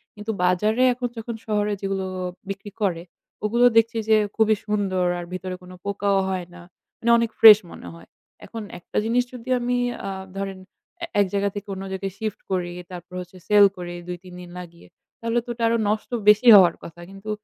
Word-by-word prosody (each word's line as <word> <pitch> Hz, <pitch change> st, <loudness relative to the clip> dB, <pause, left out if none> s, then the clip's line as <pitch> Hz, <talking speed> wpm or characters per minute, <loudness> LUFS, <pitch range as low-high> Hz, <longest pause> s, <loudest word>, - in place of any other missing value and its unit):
কিন্তু 210 Hz, +1 st, -4 dB
বাজারে 210 Hz, +7 st, +2 dB
এখন 245 Hz, 0 st, -3 dB
যখন 225 Hz, +1 st, -5 dB
শহরে 210 Hz, -1 st, 0 dB
যেগুলো 195 Hz, -1 st, -2 dB, 0.4 s
বিক্রি 195 Hz, +1 st, -6 dB
করে, 170 Hz, -4 st, 0 dB, 0.4 s
ওগুলো 235 Hz, +3 st, +3 dB
দেখছি 230 Hz, +1 st, +3 dB
যে 220 Hz, -, +6 dB, 0.2 s
খুবই 220 Hz, -1 st, +3 dB
সুন্দর 195 Hz, -4 st, 0 dB
আর 175 Hz, -, -6 dB
ভিতরে 185 Hz, 0 st, -5 dB
কোনো 180 Hz, 0 st, -12 dB
পোকাও 200 Hz, 0 st, 0 dB
হয় 185 Hz, -2 st, -3 dB
না। 180 Hz, -, -12 dB, 0.4 s
মানে 235 Hz, +1 st, +2 dB
অনেক 230 Hz, -1 st, +1 dB
ফ্রেশ 215 Hz, -2 st, +11 dB
মনে 90 Hz, -, -10 dB
হয়। 85 Hz, 0 st, -14 dB, 0.4 s
এখন 225 Hz, -, -7 dB, 0.2 s
একটা -, -, -7 dB
জিনিস 245 Hz, +2 st, +2 dB
যদি 250 Hz, 0 st, -9 dB
আমি 245 Hz, +1 st, 0 dB, 0.3 s
আ -, -, -2 dB, 0.3 s
ধরেন, 195 Hz, -1 st, -4 dB, 0.4 s
এ -, -, 0 dB
এক 200 Hz, -, +5 dB
জায়গা 200 Hz, 0 st, +1 dB
থেকে 205 Hz, +1 st, -6 dB
অন্য 190 Hz, -, -6 dB
জায়গায় 190 Hz, 0 st, -4 dB
শিফট 215 Hz, -1 st, -4 dB
করি, 175 Hz, -2 st, -1 dB, 0.2 s
তারপর 180 Hz, +1 st, -10 dB
হচ্ছে 180 Hz, +1 st, -12 dB
সেল 205 Hz, -1 st, +7 dB
করি 175 Hz, -1 st, -6 dB
২-৩ 180 Hz, 0 st, -8 dB
দিন 175 Hz, -, -11 dB
লাগিয়ে, 170 Hz, -1 st, -12 dB, 0.3 s
তাহলে 230 Hz, +1 st, 0 dB
তো 245 Hz, -, -12 dB
ওটা 235 Hz, -, -5 dB
আরো 230 Hz, -, +2 dB
নষ্ট 215 Hz, +1 st, -2 dB, 0.2 s
বেশি 215 Hz, +4 st, +5 dB
হওয়ার 180 Hz, -4 st, +7 dB
কথা। 170 Hz, +1 st, -11 dB
কিন্তু 195 Hz, +2 st, -10 dB
200 Hz, 190 wpm, -23 LUFS, 185-220 Hz, 0.4 s, ফ্রেশ